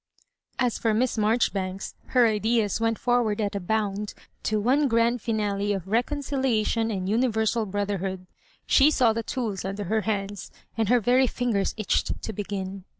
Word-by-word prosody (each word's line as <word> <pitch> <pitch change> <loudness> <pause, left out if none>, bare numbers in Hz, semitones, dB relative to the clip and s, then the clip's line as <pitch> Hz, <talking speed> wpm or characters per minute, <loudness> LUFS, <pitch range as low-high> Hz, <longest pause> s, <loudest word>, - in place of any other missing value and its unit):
As 250 -3 0
for 225 -2 +1
Miss 250 +3 +1
Maijoribanks, 210 -4 0
her 250 -2 +4
ideas 220 0 +1
went 225 -1 +1
for 245 -1 +2
ward 215 -2 -1
at 205 -2 -1
a 200 - -2
bound 205 +1 -2 0.3
to 215 0 0
one 270 +7 +3
grand 230 0 +2
finale 205 -2 -1
of 190 -3 -4
reconcili 260 +2 0
ation 225 +1 0
and 190 -4 -3
universal 220 0 +1
brotherhood. 195 -2 -3 0.4
She 275 +2 +5
saw 245 -7 +3
the 230 - -2
tools 230 -7 -3
under 195 +2 -4
her 220 +4 0
hands, 205 -2 -3 0.3
and 220 -2 0
her 245 0 +5
very 250 +4 +3
fingers 230 -6 -1
itch 215 - 0
ed - - -3
to 220 - -4
begin. 195 -1 -5
220 Hz, 170 wpm, -26 LUFS, 200-235 Hz, 0.4 s, She